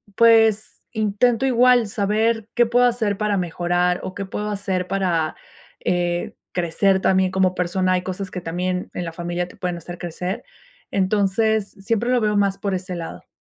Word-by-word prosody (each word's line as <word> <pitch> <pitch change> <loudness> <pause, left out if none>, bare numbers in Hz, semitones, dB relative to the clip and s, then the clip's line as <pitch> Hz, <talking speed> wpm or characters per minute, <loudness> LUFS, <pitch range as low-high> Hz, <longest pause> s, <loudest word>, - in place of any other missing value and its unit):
pues, 225 -2 +4
intento 220 +3 +1
igual 250 -2 +4
saber 220 +2 0
qué 240 -1 +5
puedo 245 +2 +3
hacer 225 -5 +1
para 210 -1 0
mejorar, 175 0 0
o 185 - -6
qué 200 - -4
puedo 210 +2 -4
hacer 190 -3 -2
para, 175 -5 0 0.5
eh, 175 -1 -1 0.2
crecer 190 +3 +2
también 190 -1 +3
como 190 -1 +2
persona, 185 +1 0
hay 180 - +1
cosas 185 +1 -5
que 180 - -4
también 180 +2 -3
en 180 - -3
la 165 - -4
familia 175 +1 -3
te - - -16
pueden 180 -2 -2
hacer 175 +1 -8
crecer. 180 +3 -5 0.4
Entonces, 205 +2 +1
siempre 230 +4 -1
lo 245 -2 +3
veo 210 -1 +1
más 195 -1 +2
por 195 0 -2
ese 185 0 -4
lado. 165 - -7
195 Hz, 170 wpm, -22 LUFS, 180-215 Hz, 0.5 s, qué